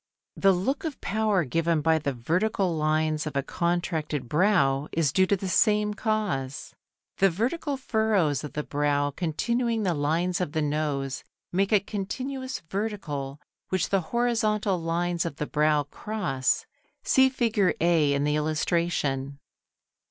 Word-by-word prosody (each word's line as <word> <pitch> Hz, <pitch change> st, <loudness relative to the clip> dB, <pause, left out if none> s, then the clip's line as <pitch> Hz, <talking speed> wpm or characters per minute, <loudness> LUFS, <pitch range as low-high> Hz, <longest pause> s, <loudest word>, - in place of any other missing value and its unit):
The 195 Hz, -, +4 dB
look 195 Hz, +10 st, -1 dB
of 315 Hz, -4 st, -4 dB
power 210 Hz, -3 st, +1 dB
given 165 Hz, +4 st, +1 dB
by 160 Hz, +1 st, +3 dB
the 145 Hz, -2 st, -1 dB
vertical 175 Hz, -, 0 dB
lines 155 Hz, 0 st, 0 dB
of 150 Hz, -, -6 dB
a 140 Hz, -, +1 dB
contracted 160 Hz, -5 st, -2 dB
brow 150 Hz, -, +2 dB
is 160 Hz, -4 st, +1 dB
due 190 Hz, 0 st, +4 dB
to 200 Hz, -, +2 dB
the 190 Hz, -, -4 dB
same 210 Hz, +3 st, +3 dB
cause. 205 Hz, -, -2 dB, 0.4 s
The 195 Hz, -, +5 dB
vertical 265 Hz, -, -2 dB
furrows 215 Hz, -, +1 dB
of 150 Hz, -, -7 dB
the 150 Hz, -, -2 dB
brow 145 Hz, 0 st, 0 dB
continuing 230 Hz, -, -1 dB
the 180 Hz, -3 st, +1 dB
lines 165 Hz, +5 st, 0 dB
of 155 Hz, -4 st, -2 dB
the 160 Hz, -, 0 dB
nose, 145 Hz, -3 st, -2 dB, 0.3 s
make 195 Hz, +3 st, +1 dB
a 210 Hz, -, +6 dB
continuous 255 Hz, +7 st, -4 dB
vertical 160 Hz, -8 st, -4 dB, 0.3 s
which 185 Hz, -1 st, 0 dB
the 195 Hz, -1 st, +2 dB
horizontal 215 Hz, -5 st, +1 dB
lines 170 Hz, +1 st, 0 dB
of 165 Hz, -4 st, -4 dB
the 150 Hz, -, -3 dB
brow 150 Hz, 0 st, +2 dB
cross 145 Hz, -4 st, -1 dB, 0.4 s
(see 265 Hz, 0 st, +5 dB
Fig. 230 Hz, -7 st, +1 dB
A 165 Hz, -3 st, +3 dB
in 140 Hz, -, 0 dB
the 150 Hz, 0 st, +1 dB
illustration). 150 Hz, -3 st, -1 dB
170 Hz, 145 wpm, -26 LUFS, 150-210 Hz, 0.4 s, a